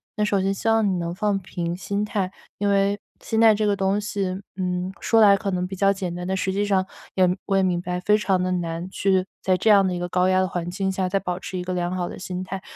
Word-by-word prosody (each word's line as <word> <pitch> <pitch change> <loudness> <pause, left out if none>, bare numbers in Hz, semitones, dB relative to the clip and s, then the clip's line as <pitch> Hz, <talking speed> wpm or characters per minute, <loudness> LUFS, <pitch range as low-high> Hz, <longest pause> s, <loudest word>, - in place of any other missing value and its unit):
那 210 - +1
首 200 -2 +1
先 195 +1 +1
希 210 - -5
望 225 -2 +3
你 185 -2 0
能 170 0 -3
放 205 +1 0
平 170 -2 -4
心 200 +2 -2
态， 200 -3 -2 0.3
因 205 - -1
为 200 +1 +2 0.2
心 225 - -1
态 225 -1 +7
这 215 0 0
个 205 - +2
东 195 +1 +1
西， 195 -2 -2 0.2
嗯， 180 0 -2
说 225 -1 +3
来 200 -2 +7
可 200 -2 -3
能 180 0 -1
比 190 - -6
较 195 +1 +3
简 185 -3 -4
单， 180 +1 -5
但 190 - 0
实 190 0 -1
际 205 +2 0
上 190 -2 +2 0.3
也 185 -1 +4 0.2
我 195 - 0
也 190 - +3
明 180 -2 +1
白， 180 0 -3
非 210 +3 +4
常 190 -3 +1
地 185 0 0
难 170 0 -3
去 190 -1 +1 0.2
在 185 -1 +2
这 220 - +1
样 200 -2 +6
的 180 - -1
一 175 - -3
个 175 - -2
高 180 +1 +2
压 185 0 +3
的 185 - +1
环 175 -1 -3
境 190 +1 -1
下 190 -1 -1
再 195 +1 0
保 180 -1 -3
持 185 - -6
一 180 - -3
个 185 0 -3
良 175 0 -1
好 175 -1 -2
的 - - -8
心 180 0 -4
态。 190 +1 -6
190 Hz, 300 characters per minute, -23 LUFS, 180-200 Hz, 0.3 s, 态